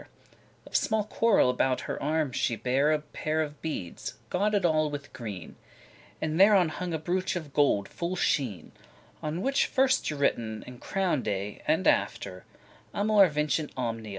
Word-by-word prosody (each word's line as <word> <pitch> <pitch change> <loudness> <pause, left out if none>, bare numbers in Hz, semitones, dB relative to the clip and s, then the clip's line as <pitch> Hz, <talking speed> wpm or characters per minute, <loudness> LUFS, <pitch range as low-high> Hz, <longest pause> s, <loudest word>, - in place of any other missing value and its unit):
*neat - - -16 0.6
Of - - -11
small 220 -1 +2
coral 215 - +3
about 130 +1 +1
her - - -5
arm 150 -1 0
she 120 - 0
bare 130 +6 +1
A 155 - +3
pair 155 +1 -3
of 150 -1 -8
beades, 125 - -5 0.2
gauded 205 0 +1
all 155 -2 +2
with 145 -1 -7
green; 105 -9 -7 0.6
And 155 +2 -2
thereon 195 -4 +6
hung 180 +2 -4
a 160 - 0
brooch 180 +4 -1
of 155 -5 -6
gold 105 -9 +2
full 175 +1 -4
sheen, 130 - -1 0.5
On 155 +4 -3
which 275 +1 +2
was - - -21
first 265 - +3
y 150 - -5
written 115 -6 0
a - - -9
crown'd 180 - -1
A, 100 0 -3
And - - +2
after, 90 -1 0 0.5
*Amor 205 -1 +5
vincit 150 0 -1
omnia. 115 -3 -3
155 Hz, 170 wpm, -28 LUFS, 125-180 Hz, 0.6 s, thereon